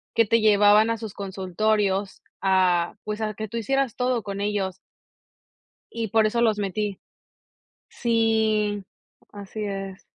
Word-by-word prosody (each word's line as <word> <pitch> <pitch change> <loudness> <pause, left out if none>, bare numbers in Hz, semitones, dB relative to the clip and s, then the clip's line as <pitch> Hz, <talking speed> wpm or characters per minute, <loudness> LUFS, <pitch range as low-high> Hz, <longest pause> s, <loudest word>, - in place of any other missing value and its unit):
que 230 - +4
te 230 +2 +2
llevaban 210 +1 +5
a 230 - 0
sus 220 -3 -7
consultorios 195 +1 -1 0.2
a, 185 -3 +2
pues, 210 +1 -4
a 215 -2 -2
que 220 +1 -5
tú 230 +3 -6
hicieras 270 +1 0
todo 250 -2 0
con 200 0 -5
ellos 195 -3 -2 1.2
y 230 -1 -2
por 220 +2 +3
eso 235 +2 +1
los 220 -3 +3
metí. 205 0 -2 0.9
Sí. 220 -3 +1 0.5
Así 205 +1 -7
es. 195 -1 -5
210 Hz, 135 wpm, -24 LUFS, 195-220 Hz, 1.2 s, llevaban